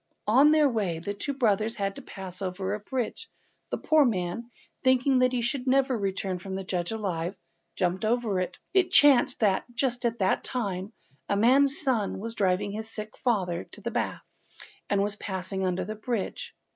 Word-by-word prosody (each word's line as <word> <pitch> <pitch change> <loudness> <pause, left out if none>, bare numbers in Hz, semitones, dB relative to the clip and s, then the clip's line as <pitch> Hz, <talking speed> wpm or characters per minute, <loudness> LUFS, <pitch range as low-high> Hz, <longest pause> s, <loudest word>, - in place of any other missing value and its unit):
On 265 +8 +6
their 305 -1 +5
way 205 -10 -1
the 185 +5 -4
two 280 +8 -4
brothers 220 -3 +1
had 195 -2 -2
to - - -7
pass 190 -1 -9
over 190 +1 -2
a 210 - -2
bridge, 245 +2 -4 0.4
and - - -2
the - - -19
poor 310 -1 +6
man, 220 0 -1 0.3
thinking 260 +1 +4
that 255 0 +4
he 245 -2 -1
should 250 +2 -2
never 265 0 +3
return 195 -3 -2
from 190 +1 -6
the 195 - -4
judge 180 -1 -2
alive, 190 -5 -2 0.4
jumped 180 +1 0
over 220 -3 +1
it. 185 - -3 0.2
It 380 -2 +4
chanced 270 -3 +5
that, 200 -3 +3
just 245 -1 0
at 235 -1 0
that 190 -3 +1
time, 200 -5 -3 0.4
a 200 - +2
man's 270 +6 +4
son 245 -8 0
was 225 +3 -5
driving 195 -2 +1
his 220 +2 -5
sick 215 -1 -6
father 185 -8 0
to - - -11
the - - -3
baths, - - -2 0.6
and 200 -1 +2
was 205 +1 -1
passing 190 0 -4
under 180 0 -1
the 215 - -4
bridge. 215 -1 -4
215 Hz, 190 wpm, -27 LUFS, 190-250 Hz, 0.6 s, On